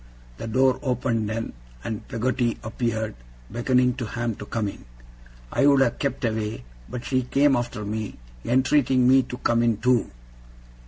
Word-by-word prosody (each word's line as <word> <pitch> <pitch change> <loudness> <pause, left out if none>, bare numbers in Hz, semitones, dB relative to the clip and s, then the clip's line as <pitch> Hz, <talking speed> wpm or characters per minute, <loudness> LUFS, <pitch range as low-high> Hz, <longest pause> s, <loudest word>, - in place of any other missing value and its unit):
The - - -6
door 130 +3 +3
opened 125 -5 0
then, 115 +1 -3 0.3
and 110 -2 -5
Peggotty 120 -1 0
appeared, 110 -1 -2 0.4
beckoning 125 +2 +2
to 120 -4 -3
Ham 120 +1 -2
to 105 - -8
come 110 -3 -1
in. 100 - -7 0.7
I 140 - +3
would 140 -1 +5
have 120 -3 +2
kept 135 -1 -1
away, 110 - -2 0.3
but 120 - -6
she 130 -1 +1
came 135 +3 +3
after 120 -4 -3
me, 110 0 -4 0.3
entreating 130 0 +3
me 130 +1 +7
to 125 0 -7
come 120 -1 +2
in 115 -2 +2
too. 125 0 +2
120 Hz, 160 wpm, -25 LUFS, 110-130 Hz, 0.7 s, me